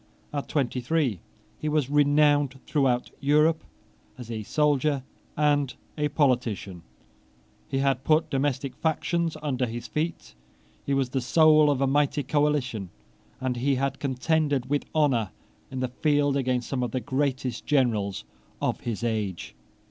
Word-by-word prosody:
At 145 -1 -3
twenty 130 -3 -1
three 130 - 0 0.4
he 155 - -2
was 150 -3 +1
renowned 145 -1 +3
throughout 130 -4 +1
Europe 150 +3 +3 0.5
as 120 -2 -8
a 110 -1 -3
soldier 145 +2 +1 0.3
and 145 -3 +2 0.2
a 150 -1 0
politician. 125 - 0 0.9
He 135 - -1
had 135 -1 +1
put 155 +2 +2
domestic 135 -1 -1
factions 165 +1 0
under 130 -4 0
his 120 +1 -6
feet: 155 - -3 0.5
he 140 - +2
was 135 -2 0
the 130 0 -1
soul 155 +4 +5
of 140 -2 +1
a - - +4
mighty 145 +1 +1
coalition; 130 - 0 0.5
and 130 -1 -2
he 135 +3 +1
had 135 +1 -1
contended 140 0 0
with 145 - +1
honour 130 -9 +2 0.4
in 130 -1 -5
the 130 - -1
field 145 +2 +1
against 125 -2 0
some 130 -2 -1
of 125 - -1
the 130 - -2
greatest 130 -2 -2
generals 110 -9 +1 0.4
of - - -1
the 115 -3 -3
age. 105 -6 -3
135 Hz, 145 wpm, -26 LUFS, 125-150 Hz, 0.9 s, soul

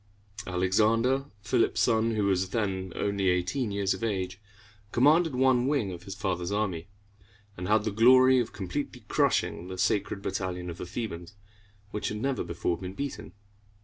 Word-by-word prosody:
Alexander, 110 +9 +2 0.2
Philip's 115 +3 +1
son, 115 -1 +2
who 105 -2 +1
was 95 -1 +1
then 95 -4 -2
only 100 -2 0
eighteen 90 +7 0
years 100 -1 0
of - - -7
age, 95 -3 -2 0.5
commanded 150 +4 +4
one 130 -1 +3
wing 135 -9 0
of 85 -1 -8
his 95 0 -6
father's 95 -3 -2
army, 100 -5 -2 0.7
and 90 +1 -5
had 105 +1 +3
the 110 - -1
glory 130 +4 +6
of 120 - -2
completely 120 +4 -5
crushing 85 - +1
the 95 0 -6
Sacred 100 +1 0
Battalion 90 -3 -3
of 85 - -10
the - - -5
Thebans, 95 -2 -6 0.6
which 105 - -3
had 105 - -3
never 135 +4 -1
before 85 0 -2
been 95 0 -7
beaten. 125 - -5
100 Hz, 160 wpm, -28 LUFS, 95-120 Hz, 0.7 s, glory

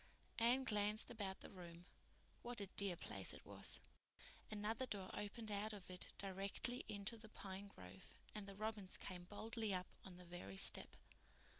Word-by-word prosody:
Anne 245 +3 +6
glanced 210 -2 +5
about 200 -5 -2
the - - -7
room. 175 -2 -8 0.6
What 240 -1 -3
a 200 - 0
dear 195 -1 +4
place - - +3
it - - -10
was! - - +4 0.7
Another 220 +4 0
door 195 -4 -2
opened 210 +2 -3
out 210 +2 +1
of 190 -3 -6
it 180 - 0
directly 200 +6 0
into 205 +2 0
the 220 -1 -10
pine 195 -1 -5
grove 95 - -10 0.2
and 210 -2 -3
the 200 - -6
robins 215 -2 -1
came 180 -2 -5
boldly 215 +1 -1
up 180 0 -3
on 185 -2 -8
the 180 - -10
very 170 - -5
step. - - +3
200 Hz, 165 wpm, -45 LUFS, 185-215 Hz, 0.7 s, Anne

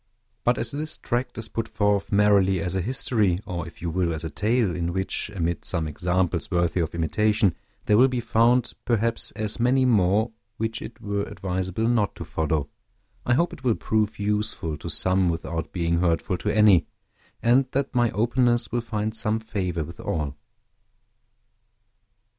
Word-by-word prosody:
But 120 0 +2
as 115 0 +1
this 155 +2 -4
tract 125 +1 -2
is 115 -1 -4
put 115 0 -3
forth 105 -2 0
merely 100 -2 +4
as 90 +2 -2
a 95 - 0
history, 110 -4 +1
or, 85 -2 -4
if 85 - -13
you 85 - -1
will, 85 -1 0
as 80 - -6
a 80 - -4
tale, 105 - +1
in 85 -1 -2
which, 95 +1 -2
amid 85 -2 -1
some 80 -1 +1
examples 90 +2 -1
worthy 85 -1 +1
of 85 -1 -2
imitation, 100 +3 +2 0.3
there 105 +1 +4
will 130 - +7
be 130 -2 -2
found, 120 +1 +2
perhaps, 115 -1 0
as 110 +1 -2
many 130 +2 +3
more 110 -1 +3 0.3
which 110 0 -2
it 115 - -9
were 100 0 -2
advisable 95 +3 -2
not 115 -4 +1
to 85 - -7
follow, 80 -2 -1 0.6
I 125 - +4
hope 170 +5 +1
it 130 - -11
will 120 -4 +2
prove 110 0 0
useful 105 -6 -1
to - - -6
some 95 -1 +2
without 80 0 -3
being 85 -2 0
hurtful 85 +1 0
to - - -2
any, 105 -5 +5 0.6
and 125 +3 +4
that 140 0 -1
my 120 -1 +3
openness 120 0 +1
will 120 +1 0
find 110 -1 -3
some 110 0 +1
favor 95 -7 -3
with 85 +3 -10
all. 75 -3 -3
105 Hz, 170 wpm, -25 LUFS, 85-115 Hz, 0.6 s, will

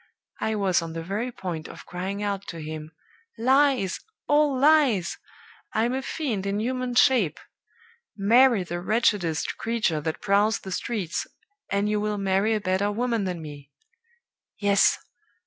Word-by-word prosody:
I 220 - -1
was 195 -4 +2
on 165 -1 -6
the 165 0 -5
very 210 +8 -3
point 170 -8 -5
of - - -11
crying 190 +3 -4
out 200 -1 -3
to 165 - -6
him, 155 0 -7 0.5
'Lies! 260 -4 +3 0.3
all 290 -2 +3
lies! 280 - +3 0.5
I'm 230 +3 +1
a 265 - -1
fiend 245 -9 -3
in 200 +1 -1
human 250 +2 -2
shape! 245 - +4 0.8
Marry 230 +1 +5
the 175 0 -5
wretchedest 190 -6 0
creature 220 -9 0
that 160 +1 -3
prowls 205 +2 +2
the 190 - -8
streets, 205 -2 -3 0.4
and 200 +1 +1
you 210 0 0
will 210 0 -1
marry 195 +3 +1
a - - 0
better 190 +2 0
woman 230 -1 -1
than 175 -3 -4
me!' 145 -2 -10 0.9
Yes! 200 -1 +3
205 Hz, 145 wpm, -25 LUFS, 180-235 Hz, 0.9 s, Marry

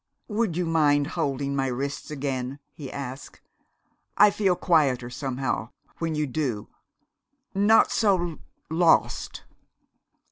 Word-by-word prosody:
"Would 210 -5 0
you 180 - 0
mind 150 -3 +3
holding 140 -4 -1
my 135 -1 0
wrists 135 +3 -4
again?" 135 -2 -3 0.2
he 140 -4 -8
asked. 135 -1 -7 0.8
"I 210 0 +7
feel 195 -3 +1
quieter, 135 -9 +2
somehow, 130 -3 -3 0.3
when 165 -2 -1
you 150 0 0
do 130 -6 -3 0.8
not 205 +3 +4
so 180 -7 +1 0.3
lost." 165 0 +2
145 Hz, 110 wpm, -26 LUFS, 135-175 Hz, 0.8 s, I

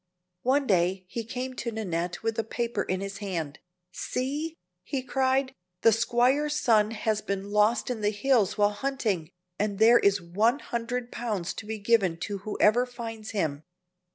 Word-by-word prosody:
One 275 +3 +2
day 185 -2 +1
he 230 - -3
came 250 +3 -4
to 235 - -3
Nannette 180 -5 -3
with 225 0 -1
a - - +1
paper 235 +2 -2
in 185 +1 -2
his 195 0 -5
hand. 165 -8 -4 0.3
"See!" 290 - -3 0.2
he 270 -3 -3
cried, 265 0 +1 0.3
"the 225 - +7
squire's 250 +6 +2
son 215 -5 +4
has 215 -1 -1
been 200 0 -4
lost 210 +4 +3
in 230 -3 -4
the 210 - +2
hills 215 -1 +2
while 205 0 +4
hunting, 210 - -1 0.3
and 205 -1 0
there 230 +3 +7
is 200 0 +3
one 205 +9 +1
hundred 240 -2 -4
pounds 210 -7 -3
to 220 - -8
be 220 0 -3
given 200 -5 +2
to 200 +1 -3
whoever 215 +4 +2
finds 225 -3 -7
him. 155 -8 -2
220 Hz, 165 wpm, -27 LUFS, 200-245 Hz, 0.3 s, the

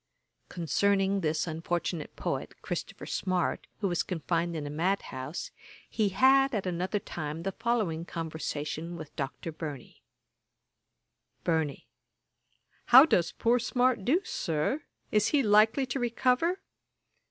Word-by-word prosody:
Concerning 195 +3 +1
this 155 -1 0
unfortunate 165 0 -3
poet, - - -4
Christopher - - -5
Smart, 185 -2 -1
who 200 - +2
was 175 -2 0
confined 170 0 -1
in 150 -2 -3
a - - -4
mad 180 +6 +1
house, 130 +5 -5 0.4
he 215 -3 +1
had, 265 +5 +4
at 200 - -1
another 180 +3 -1
time, 160 -4 -5
the 195 - -1
following 205 -8 -1
conversation 160 0 -4
with 155 -2 -10
Dr. 140 +4 -4
Burney: 150 -5 -8 1.4
BURNEY. 160 -4 -1 1.0
'How 260 +4 +10
does 175 - +2
poor 240 +1 +2
Smart 245 -2 +1
do, 315 - +3
Sir; 165 - -1 0.3
is 210 0 +3
he 290 -3 +3
likely 215 +5 +4
to 255 +2 -3
recover?' 250 +8 +1
180 Hz, 125 wpm, -29 LUFS, 160-230 Hz, 1.4 s, How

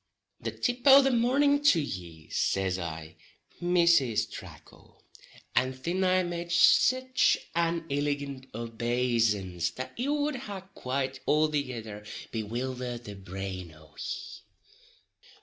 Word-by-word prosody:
"The - - -3
tip 245 0 -2
o' 275 0 +10
the 270 - +3
mornin' 280 +4 +3
to 195 - +6
ye," 85 - -6
says 95 -1 0
I, 80 -2 -6 0.4
"Mrs. 170 -11 +3
Tracle," - - -13 0.5
and 130 0 +1
thin 175 +8 -1
I 185 0 +3
made 170 0 -4
sich 255 +8 +4 0.2
an 170 0 +1
illigant 140 -2 -2
obaysance 115 -6 0
that 130 - -6
it 250 +4 -1
wud 295 -1 0
ha 205 -6 -6
quite 130 +1 -3
althegither 130 -9 0 0.3
bewildered 120 +2 -4
the 105 - -8
brain 95 -2 -6
o' 75 -1 -19
ye. - - -6
130 Hz, 115 wpm, -29 LUFS, 105-175 Hz, 0.5 s, o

